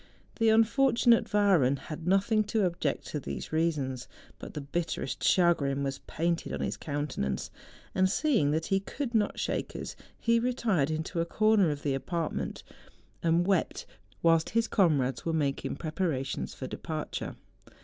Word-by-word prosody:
The 225 - +3
un¬ 220 +1 +6
fortunate 240 -1 +3
Wahren 190 -11 +4
had 155 +4 -8
nothing 200 +3 +3
to 210 -1 +1
object 170 -5 -1
to 150 - -3
these 140 - -6
reasons; 145 -6 -1 0.3
but - - -9
the - - -2
bitterest 140 -1 -3
chagrin 145 -6 +3
was 135 0 -3
painted 170 +1 -1
on - - -3
his - - -1
countenance; 140 - -3 0.4
and 185 0 +3
seeing 230 - +2
that 160 +2 0
he 195 - +2
could 240 +6 -5
not 210 -2 +1
shake - - -2
us, - - -5 0.2
he 230 0 +3
retired 230 - +1
into 160 +2 -2
a - - 0
corner 215 -1 +3
of 145 -1 -4
the 140 - +1
apartment 165 +4 -3 0.6
and 170 +1 +2
wept, 190 -3 0 0.4
whilst 165 -1 +4
his 230 -1 +3
comrades 140 - +2
were 165 - -1
making 145 -4 -1
preparations 155 -5 -2
for 130 - -6
departure. 155 +3 -5
165 Hz, 155 wpm, -29 LUFS, 145-205 Hz, 0.6 s, un¬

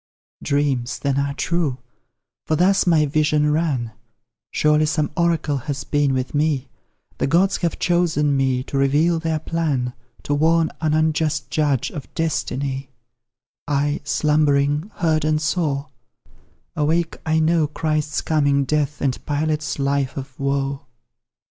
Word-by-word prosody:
Dreams, 140 -4 0
then, 140 -1 0
are 140 0 -1
true 165 -7 -1 0.7
for 155 - +2
thus 190 +4 +3
my 160 -3 +4
vision 150 0 +2
ran; 145 -7 0 0.6
Surely 150 0 +2
some 150 -1 0
oracle 165 -4 +1
has 145 +1 -4
been 145 -2 +1
with 130 0 -2
me, 145 -3 0 0.5
The - - +1
gods 185 +7 +3
have 170 -2 -2
chosen 160 -5 +1
me 130 -2 +1
to 135 - -3
reveal 150 +5 +2
their 160 -1 -1
plan, 150 -6 -1 0.3
To 145 - -1
warn 160 +2 +2
an 155 -1 +1
unjust 155 -3 0
judge 145 -5 +1
of 145 - -8
destiny: 140 -4 -2 0.8
I, 145 0 0
slumbering, 150 +2 +1
heard 160 -2 +1
and 155 0 +1
saw; 155 -3 -1 0.9
awake 160 +2 0
I 160 0 +1
know, 160 -1 +2
Christ's 155 0 -1
coming 145 -3 +2
death, 150 +1 -1
and 130 -2 -1
Pilate's 150 +1 -1
life 140 -1 -1
of 135 -1 -7
woe. 140 0 -2
150 Hz, 135 wpm, -21 LUFS, 140-160 Hz, 0.9 s, my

